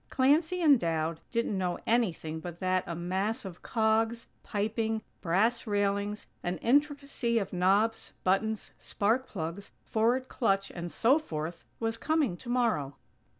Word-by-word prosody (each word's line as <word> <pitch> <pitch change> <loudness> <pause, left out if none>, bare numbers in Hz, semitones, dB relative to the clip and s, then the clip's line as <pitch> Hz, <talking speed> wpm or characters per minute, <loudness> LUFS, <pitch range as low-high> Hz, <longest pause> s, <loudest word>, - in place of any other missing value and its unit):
Clancy 315 +7 +3
and 285 -5 +7
Dowd 165 -2 -1
didn't 230 -3 0
know 180 -1 -1
anything 175 -9 0
but 175 +1 -8
that 185 -1 +1
a 170 - -3
mass 190 +6 -2
of 180 -3 -8
cogs, 225 +1 +1 0.2
piping, 220 +1 -1 0.2
brass 220 +8 +1
railings, 205 0 0 0.2
an 175 +1 -2
intricacy 280 - +1
of 200 -4 -1
knobs, 200 +5 +2
buttons, 215 +3 0
spark 225 +6 0
plugs, 170 +2 -5 0.2
forward 240 +4 +1
clutch 195 -6 0
and 175 -1 -6
so 265 +7 +4
forth 165 - -5 0.2
was 225 0 -1
coming 310 - +1
tomorrow. 230 - 0
215 Hz, 135 wpm, -30 LUFS, 180-235 Hz, 0.2 s, and